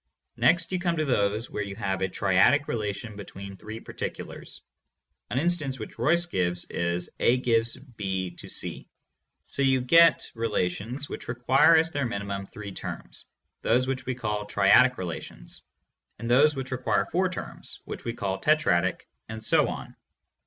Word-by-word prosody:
Next 170 0 +3
you 185 - 0
come 175 -1 0
to 155 - +1
those 105 -3 0
where - - -3
you 100 -1 -5
have 95 -3 -2
a 95 - +2
triadic 100 +12 +3
relation 105 0 -3
between 100 -1 -8
three 110 +3 -8
particulars. - - -7 0.7
(An 115 - -2
instance 155 -4 0
which 110 -1 -9
Royce 170 +8 +3
gives 90 - -1
is 85 +1 -2
"A 120 - +4
gives 115 -2 +1
B 95 -9 -4
to - - -9
C") - - -3 0.6
So - - -4
you 135 -1 +4
get 165 +7 +5
relations 115 +4 -2
which - - -7
require 125 +6 +4
as 160 0 +3
their 140 -4 -1
minimum 100 -3 -4
three 100 -2 -8
terms, - - -7 0.4
those 125 +3 +2
we 130 -1 -2
call 105 -3 -3
triadic 105 +6 +5
relations; 85 -3 -7 0.6
and 115 - -6
those 145 +5 +5
which 135 -1 -5
require 125 -5 +1
four 185 +2 0
terms, 185 - -7
which - - -7
we 115 - -3
call 95 -3 -3
tetradic, 150 - +2 0.3
and 110 0 -7
so - - +4
on. - - -7
115 Hz, 160 wpm, -27 LUFS, 100-135 Hz, 0.7 s, get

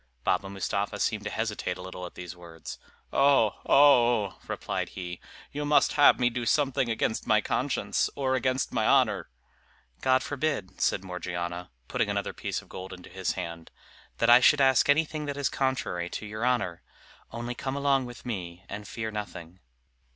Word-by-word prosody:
Baba 95 +2 +1
Mustapha 100 +1 -2
seemed 105 0 -1
to - - -1
hesitate 105 -5 -2
a - - -8
little 90 -1 -7
at - - -15
these 90 -1 -7
words. 85 -2 -10 0.3
"Oh! 135 -6 +4
oh!" 120 -7 +5
replied - - -3
he, 90 -1 -6 0.3
"you 145 +1 -3
must 145 0 +3
have 145 - +6
me 120 -1 +3
do 120 +1 -3
something 135 0 +1
against 110 0 -1
my - - +5
conscience, - - 0
or 135 -2 0
against 130 -1 0
my - - +1
honor?" - - +3 0.7
"God 130 0 +3
forbid," 140 -10 -3
said 95 - +1
Morgiana, 90 -1 -5 0.2
putting - - 0
another - - -2
piece - - -4
of - - -21
gold 95 0 -8
into 90 -1 -12
his 95 0 -2
hand, 85 -2 -6 0.5
"that 115 - +2
I 120 +1 +9
should 145 +3 +5
ask 135 0 +4
anything 155 +1 +2
that 145 0 -3
is 140 -2 0
contrary 130 -10 -1
to 105 - -5
your 110 +2 -5
honor! 120 -9 0 0.5
only 120 +1 -4
come 130 +2 -4
along 140 -2 +2
with 120 0 -10
me 90 -6 -5
and 105 0 -7
fear 110 -1 -4
nothing." 95 -4 -7
110 Hz, 175 wpm, -28 LUFS, 90-130 Hz, 0.7 s, I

